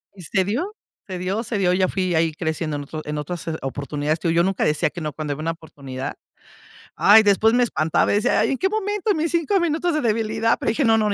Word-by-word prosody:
Y 185 - -11
se 190 +4 +1
dio, 310 - -2 0.3
se 185 -2 -5
dio, 190 +5 -2
se 230 -1 -3
dio, 180 -2 +3
ya 185 0 +2
fui 185 -1 -1
ahí 160 0 +2
creciendo 160 -1 -3
en 145 - -5
otros, 155 +2 -7
en 150 0 -4
otras 170 +2 -6
s 160 -1 -2
oportunidades 145 +3 -2
que 165 0 0
yo 170 +1 +3
nunca 190 +1 0
decía 150 0 +1
que 175 - -7
no, 150 -2 -4
cuando 150 -1 -3
había 145 - -7
una 165 +1 -1
oportunidad. 140 -5 -7 0.8
Ay, 220 +2 +7
después 210 +2 +4
me 245 0 +4
espantaba 155 -8 +1
y - - +3
decía: 205 - +2
"¿Y - - 0
en 270 - 0
qué 380 - +1
momento? 420 0 -1
En - - 0
mis 320 +1 0
5 340 +4 +1
minutos 340 0 0
de 305 - 0
debilidad", 225 -1 +1
pero - - -1
dije: 235 +4 +1
"No, 225 0 +4
no, 210 -2 +1
190 Hz, 255 wpm, -22 LUFS, 155-230 Hz, 0.8 s, Ay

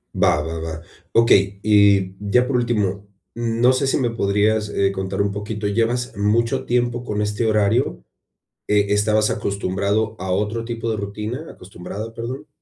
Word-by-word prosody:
Va, - - +4
va, 80 +1 -5
va. 80 0 -5 0.4
Okey, 100 -4 +4
y 100 -3 +4 0.2
ya 125 +2 +4
por 135 - -1
último, 105 -5 -1 0.3
mm, 115 -1 -2
no 125 +2 +6
sé 135 +1 0
si - - +2
me 130 -4 +1
podrías, 105 -1 +1
eh, 100 -1 +1
contar 95 0 -3
un 100 0 0
poquito, 105 +1 -4
¿llevas 120 +4 0
mucho 105 +3 +1
tiempo 120 0 0
con 105 -3 -2
este 105 +2 -1
horario? 110 - +1 0.6
Eh, 105 -1 +3
¿estabas 105 +1 +2
acostumbrado 100 +1 -1
a 95 +1 -4
otro 105 +5 -1
tipo 115 0 -3
de 110 - -1
rutina?, 105 +8 -5
acostumbrada, 100 +4 -8
perdón. 125 +6 -6
105 Hz, 160 wpm, -21 LUFS, 100-115 Hz, 0.6 s, no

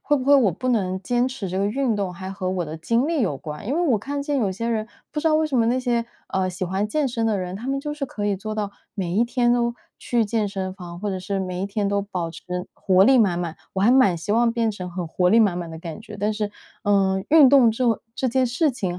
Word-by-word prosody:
会 295 - +2
不 260 - -3
会 285 +1 +6
我 250 -8 +5
不 255 +10 -4
能 190 -6 +1
坚 245 +5 +1
持 235 -8 -5
这 185 - -2
个 200 - +1
运 245 +2 0
动 195 -3 -2
还 190 +1 -7
和 190 -1 -3
我 185 -2 -1
的 160 +1 -7
经 230 - +1
历 325 -2 0
有 180 - 0
关。 150 +7 -8
因 270 - 0
为 335 - +1
我 235 -5 +3
看 280 +6 -4
见 290 -1 -1
有 210 -6 +1
些 200 +5 -4
人 220 -1 -1 0.2
不 300 - -2
知 320 - +2
道 310 - +3
为 315 0 +3
什 295 - -5
么 225 - +3
那 245 +3 +2
些 240 -2 0 0.2
呃， 190 -1 0
喜 185 0 -3
欢 190 +4 -1
健 300 +4 0
身 230 -3 -1
的 220 -2 +1
人， 180 0 -4
他 225 +6 -7
们 275 0 0
就 295 +2 -4
是 295 -2 -4
可 210 -4 -5
以 205 -1 +1
做 215 +3 -5
到 210 -2 -2 0.2
每 185 -4 -3
一 215 - +4
天 240 0 +2
都 235 -1 +1 0.2
去 235 -2 +1
健 215 -1 0
身 190 -1 -4
房， 175 -2 -9
或 205 +2 -3
者 190 - -3
是 195 +2 -2
每 185 -1 -3
一 195 - -1
天 200 0 -1
都 200 0 +1
保 185 -4 -4
持 165 - -11 0.3
活 190 -1 +3
力 260 +3 +6
满 190 -6 +3
满。 170 -2 -3 0.2
我 190 - 0
还 220 - +5
蛮 250 -9 +5
希 170 +5 -3
望 235 +1 +3
变 230 -1 0
成 185 -4 -6
很 175 0 -4
活 180 +2 +1
力 225 - +5
满 200 -6 +3
满 170 -2 -5
的 160 - -8
感 165 +2 -7
觉， 215 -1 -10
但 210 +2 0
是， 210 -1 -2 0.3
嗯， 195 -2 +2
运 300 -4 +7
动 265 -5 +6
这 230 +3 -1
种 230 -3 +2
这 260 - 0
件 260 +1 +2
事 285 +6 +1
情 185 -8 -3
210 Hz, 310 characters per minute, -23 LUFS, 185-245 Hz, 0.3 s, 运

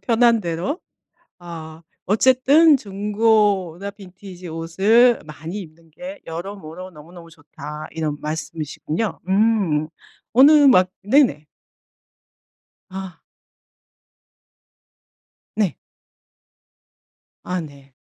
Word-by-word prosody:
편한 235 -1 +3
대로 175 - -3 0.6
어 165 -2 -10 0.2
어쨌든 260 - +4
"중고나 205 -3 0
빈티지 185 -2 -12
옷을 200 +9 +3
많이 160 +5 -8
입는 165 -2 -13
게 275 - -9
여러모로 180 +1 -8
너무너무 165 +2 -14
좋다." 150 -1 -10
이런 155 -2 -3
말씀이시군요. 155 +5 -4
음. 190 -7 +1 0.4
어느 265 +6 +7 0.2
막 185 -8 +5
네네. 210 - +3 1.5
아. 190 -2 -8 2.4
네. 205 -5 +1 1.7
아 180 -1 -3
네. 140 -3 -13
185 Hz, 165 characters per minute, -21 LUFS, 160-220 Hz, 2.4 s, 어느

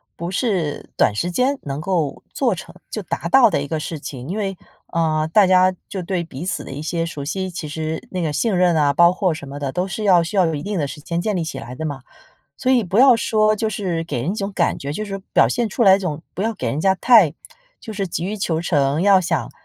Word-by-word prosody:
不 170 +1 -5
是 185 - -1
短 105 - +3
时 175 +12 -2
间 255 +9 +1
能 140 +1 -4
够 165 -5 -1
做 250 -5 +1
成 190 - -10 0.2
就 215 - -3
达 170 -2 -4
到 235 +5 +6
的 145 - 0
一 145 - -4
个 155 +2 -2
事 155 0 -5
情。 130 -1 -8
因 195 - -3
为， 195 -2 -2 0.4
呃， 155 -2 +1
大 210 -2 +6
家 185 0 +5 0.2
就 190 - -4
对 175 -1 -2
彼 160 0 -8
此 190 - -3
的 - - -9
一 140 +2 -6
些 165 +2 -2
熟 150 -4 -6
悉， 190 +5 -3
其 170 -3 -6
实 160 +1 -4
那 185 - -2
个 160 -3 -1
信 205 +7 0
任 180 -1 +3
啊， 145 -2 +3
包 170 +4 +6
括 185 -1 0
什 140 -3 -8
么 145 - -7
的 140 -2 -3
都 180 +6 -1
是 215 +3 -5
要 180 -4 +5
需 195 +5 -4
要 185 - +5
有 165 - 0
一 145 - -4
定 205 +3 -3
的 145 - 0
时 150 +2 -9
间 170 +3 -3
建 210 +3 -1
立 175 - -1
起 160 - -5
来 120 +2 -8
的 160 - -5
嘛。 145 -4 -4 0.6
所 260 - +2
以 250 -2 +4
不 185 0 -3
要 260 -1 +8
说 215 -1 +2
就 220 +1 -1
是 185 -6 -2
给 140 -7 -3
人 155 - -1
一 - - -2
种 200 -2 -3
感 175 -4 0
觉 140 - -5
就 185 +9 -3
是 195 -1 -5 0.2
表 - - +6
现 240 -2 0
出 215 - -1
来 190 -3 +7
一 - - -4
种 160 -5 -4
不 - - -7
要 225 +2 0
给 - - -3
人 145 - -2
家 190 +2 +3
太 205 - +5 0.4
就 220 - -8
是 195 -2 -3
急 170 0 -3
于 205 - -2
求 165 -5 -1
成， 145 -2 +1
要 195 -1 +6
想， 170 -3 -2
175 Hz, 290 characters per minute, -21 LUFS, 155-200 Hz, 0.6 s, 要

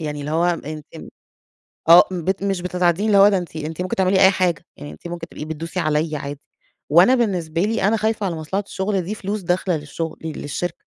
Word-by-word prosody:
يعني 150 -2 -4
اللي 145 +1 -5
هو 165 +2 +2
ان 155 -3 -3
تم - - -10 0.8
آه، 170 +1 +10
بت 185 +2 -2
مش 195 -3 -1
بتتعدّيني 180 +2 +1
اللي 205 -2 +4
هو 200 +1 +8
ده 195 - +2
أنتِ 175 -3 -6
أنتِ 155 +3 -5
ممكن 185 - -2
تعملي 190 0 +3
أي 190 - +8
حاجة، 180 -4 0
يعني 145 - -8
أنتِ - - -10
ممكن 170 -1 -6
تبقي 150 - -7
بتدوسي 160 +3 -5
عليّا 155 0 0
عادي، 140 0 -6 0.5
وأنا 175 - +6
بالنسبة 180 -9 -1
لي 220 +3 0
أنا 225 - +2
خايفة 220 -1 -1
على 175 -3 -2
مصلحة 160 +6 -3
الشغل 195 0 -1
دي 190 +5 -5
فلوس 205 +1 -4
داخلة 180 -1 0
للشغل 155 +2 -5
للشركة، 160 +2 -4
175 Hz, 210 wpm, -21 LUFS, 160-195 Hz, 0.8 s, آه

